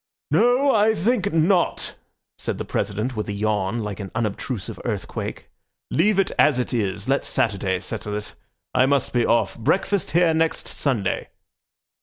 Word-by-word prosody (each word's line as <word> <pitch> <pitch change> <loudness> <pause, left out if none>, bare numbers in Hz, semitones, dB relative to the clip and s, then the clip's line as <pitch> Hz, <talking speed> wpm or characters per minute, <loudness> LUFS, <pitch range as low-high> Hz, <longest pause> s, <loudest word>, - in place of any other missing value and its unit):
"No, 255 +4 +4
I 220 +1 +4
think 215 +2 +1
not," 170 +3 +2 0.5
said - - -3
the - - -4
President 105 +5 -2
with 105 - -3
a - - -2
yawn 105 0 0
like 105 -3 -4
an 100 -2 -5
unobtrusive 110 0 -3
earthquake. - - -4 0.4
"Leave 210 -1 +3
it 195 - +2
as 150 -4 +5
it 125 - -2
is. 105 -2 -1
Let 135 +1 +2
Saturday 95 -4 0
settle 105 0 -4
it. 105 - -7 0.4
I 130 - +4
must 140 -1 +1
be 120 -1 +2
off. 115 0 +1
Breakfast 190 - +1
here 165 +1 +3
next 160 0 0
Sunday." 120 -9 -1
125 Hz, 155 wpm, -23 LUFS, 105-175 Hz, 0.5 s, as